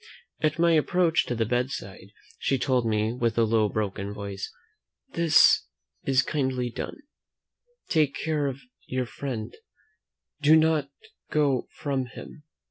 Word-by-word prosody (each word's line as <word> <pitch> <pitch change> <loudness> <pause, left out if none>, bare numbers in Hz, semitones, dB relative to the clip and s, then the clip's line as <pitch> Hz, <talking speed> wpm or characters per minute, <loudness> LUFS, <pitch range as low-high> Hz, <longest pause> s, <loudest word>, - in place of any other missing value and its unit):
At 155 -1 +1
my 170 0 +4
approach 165 +1 +2
to 120 - -1
the 115 -1 0
bedside, 120 -6 -3 0.3
she 135 - +1
told 125 -2 +1
me, 110 +1 +1
with 120 -2 -1
a 115 - +5
low 110 -1 +2
broken 100 -1 -3
voice, 100 -1 -6 0.6
"This 165 -3 +5 0.4
is 130 -1 +3
kindly 130 -4 -1
done 300 - -6 0.9
take 150 -4 +2
care 150 -2 -1
of 135 0 -5 0.3
your 130 -1 -1
friend 120 -2 -5 0.9
do 150 +2 +6
not 160 -3 +3 0.4
go 140 -4 +1
from 135 -3 -3
him!" 135 - -11
130 Hz, 130 wpm, -26 LUFS, 115-150 Hz, 0.9 s, do